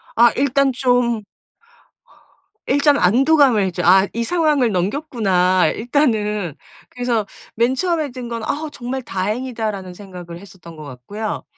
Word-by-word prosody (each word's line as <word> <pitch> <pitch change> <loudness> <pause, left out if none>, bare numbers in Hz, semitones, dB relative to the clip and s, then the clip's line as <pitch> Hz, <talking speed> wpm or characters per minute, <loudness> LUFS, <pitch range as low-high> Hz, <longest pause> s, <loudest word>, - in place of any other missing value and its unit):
아 235 +1 +6
일단 275 0 +2
좀 245 -3 +1 1.4
일단 285 +1 +3
안도감을 245 - +3
좀 - - -3
'아 190 +2 +6
이 235 +1 -2
상황을 300 -6 +1
넘겼구나 185 - +1
일단은.' 215 - 0 0.3
그래서 245 -3 -1 0.3
맨 235 +3 +1
처음에 325 -3 -1
든 245 -2 -7
건 230 -1 -4
'아 310 +1 -3
정말 255 +1 -5
다행이다.'라는 215 -2 -4
생각을 180 -3 -10
했었던 175 -4 -14
것 155 - -9
같고요. 145 - -6
230 Hz, 265 characters per minute, -19 LUFS, 190-265 Hz, 1.4 s, 아